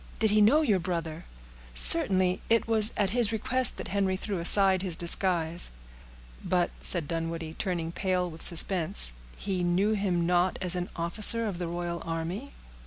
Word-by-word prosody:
"Did 220 -2 0
he 210 0 +2
know 285 +10 +3
your 210 -9 0
brother?" 165 -2 -6 0.5
"Certainly; 185 - +6
it 230 0 0
was 220 -1 0
at 195 -2 -1
his 235 -2 0
request 255 +3 +1
that - - -8
Henry 195 -1 -2
threw 195 -1 -6
aside 190 +2 +4
his 185 -3 -5
disguise." 170 -1 -3 0.7
"But," 180 -1 -1
said 170 -5 +4
Dunwoodie, 165 0 -6
turning 170 -4 -4
pale 185 0 -3
with 165 -1 -12
suspense, 160 - +1 0.2
"he 190 -3 -4
knew 180 +4 0
him 185 -5 -2
not 180 +1 0
as 180 -1 0
an 180 0 -5
officer 210 +7 +2
of 195 -5 -6
the 175 - -5
royal 170 0 -6
army?" 165 +11 -6
180 Hz, 165 wpm, -26 LUFS, 170-205 Hz, 0.7 s, Certainly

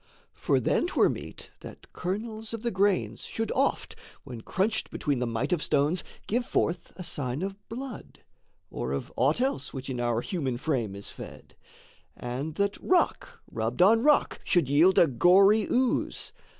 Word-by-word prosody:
For - - +1
then - - +1
'twere - - +3
meet - - -7
that - - -13
kernels 220 +4 -4
of 225 - -9
the 235 - 0
grains 195 0 +1
Should 225 0 -3
oft, 275 +2 0 0.3
when 125 -4 -8
crunched 195 - -1
between 145 -4 -1
the 125 - -1
might 115 +7 -1
of 170 - 0
stones, 150 +6 +1 0.2
Give 240 +4 0
forth 170 -7 -1
a 180 - -7
sign 145 -3 -3
of 195 0 -3
blood, 250 +1 -8 0.5
or 65 - -3
of 70 - -5
aught 140 - +2
else 255 - -2
Which 135 0 -5
in 125 - -4
our 120 -1 0
human 140 - -2
frame 120 -8 -2
is 100 - -9
fed; - - -11 0.6
and 135 +6 -4
that 200 +1 -1
Rock 465 +6 0
rubbed 115 +8 +1
on 225 +4 +5
rock 295 +2 +3
should 175 -7 +2
yield 160 +7 +4
a - - +8
gory 195 - +5
ooze. 250 0 0
175 Hz, 165 wpm, -27 LUFS, 130-220 Hz, 0.6 s, a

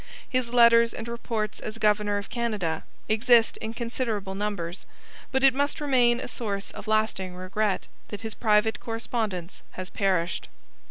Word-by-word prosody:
His 255 -2 -1
letters 235 -1 +6
and 225 - -6
reports 230 -3 -3
as 215 +1 -6
governor 210 -1 +2
of 200 - -6
Canada 210 -10 -2 0.2
exist 230 +1 +4
in 220 +1 -5
considerable 230 -5 -2
numbers, 195 -4 -4 0.4
but 265 0 +1
it 270 -1 +7
must 285 +3 0
remain 250 -5 +3
a - - -5
source 200 -4 -3
of - - -9
lasting 215 -4 0
regret 190 +2 -1 0.2
that 205 - -7
his 220 -1 -5
private 215 0 +2
correspondence 220 -6 -3
has 185 0 -6
perished. 185 -3 0
220 Hz, 150 wpm, -26 LUFS, 200-235 Hz, 0.4 s, it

